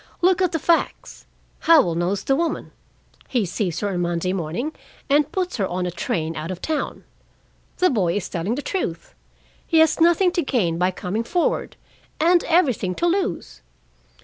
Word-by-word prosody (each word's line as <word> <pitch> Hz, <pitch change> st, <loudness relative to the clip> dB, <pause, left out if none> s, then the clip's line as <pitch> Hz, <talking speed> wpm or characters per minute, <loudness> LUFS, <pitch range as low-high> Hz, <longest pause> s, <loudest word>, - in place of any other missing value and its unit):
Look 370 Hz, +1 st, +4 dB
at 365 Hz, -2 st, +2 dB
the 330 Hz, -, 0 dB
facts! 330 Hz, +2 st, -1 dB, 0.3 s
Howell 305 Hz, -, +5 dB
knows 175 Hz, +4 st, -1 dB
the 270 Hz, -, +2 dB
woman: 335 Hz, +3 st, -2 dB, 0.6 s
he 240 Hz, -6 st, 0 dB
sees 180 Hz, -1 st, -2 dB
her 205 Hz, -, 0 dB
on 185 Hz, -3 st, -2 dB
Monday 175 Hz, +1 st, -1 dB
morning, 185 Hz, -, -3 dB, 0.4 s
and 295 Hz, +1 st, +3 dB
puts 365 Hz, -4 st, -2 dB
her 195 Hz, -4 st, 0 dB
on 180 Hz, 0 st, -2 dB
a 180 Hz, -, -2 dB
train 165 Hz, -1 st, -2 dB
out 155 Hz, +2 st, -5 dB
of 185 Hz, -1 st, -5 dB
town. 305 Hz, +6 st, -3 dB, 0.7 s
The 365 Hz, -2 st, +3 dB
boy 185 Hz, -8 st, +1 dB
is 205 Hz, -3 st, -2 dB
telling 185 Hz, +7 st, -2 dB
the 285 Hz, -, -5 dB
truth. 175 Hz, -, -4 dB, 0.5 s
He 325 Hz, -, +2 dB
has 320 Hz, +1 st, +4 dB
nothing 345 Hz, +2 st, +4 dB
to 345 Hz, -, 0 dB
gain 185 Hz, -, 0 dB
by 180 Hz, +1 st, +3 dB
coming 185 Hz, +4 st, -3 dB
forward, 345 Hz, +8 st, -1 dB, 0.4 s
and 345 Hz, +2 st, +4 dB
everything 255 Hz, -, +2 dB
to -, -, -1 dB
lose. 375 Hz, +3 st, -1 dB
230 Hz, 175 wpm, -22 LUFS, -, 0.7 s, Howell